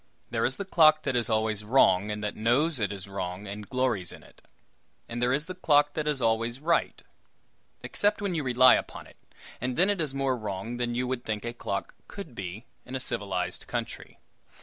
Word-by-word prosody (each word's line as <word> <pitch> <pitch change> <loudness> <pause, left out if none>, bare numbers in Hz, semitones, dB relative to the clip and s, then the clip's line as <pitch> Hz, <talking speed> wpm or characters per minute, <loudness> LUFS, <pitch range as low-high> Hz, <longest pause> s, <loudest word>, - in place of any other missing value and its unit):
There - - +1
is - - +1
the 200 - -5
clock 155 -5 +5
that 130 - -1
is 120 -1 +3
always 110 -1 0
wrong, 105 -4 +4
and 105 0 -4
that 105 - -3
knows 130 +7 +2
it 100 -2 0
is 100 -2 -6
wrong, 95 0 -5
and 100 +1 -7
glories 125 -9 0
in - - -12
it; - - -19 0.7
and 120 +1 -5
there 125 +1 +2
is 140 +4 0
the 185 - -6
clock 145 -5 +3
that 155 -1 -2
is 145 -4 0
always 115 +2 +1
right 165 +3 0 0.8
except 205 +1 +1
when 200 -3 -2
you 160 -3 -1
rely 130 0 +6
upon - - -2
it, - - -18 0.4
and 125 0 -2
then 190 +3 +4
it 200 -4 -1
is 145 -3 -2
more 135 -1 +1
wrong 110 +1 -5
than 120 -1 -1
you 125 +1 0
would 125 -1 -3
think 110 0 -3
a 120 - -3
clock 100 -4 -4
could 195 -10 -8
be 100 +2 -6 0.2
in 130 - -7
a - - -1
civilized 100 -7 -2
country. - - -5
120 Hz, 210 wpm, -28 LUFS, 105-145 Hz, 0.8 s, rely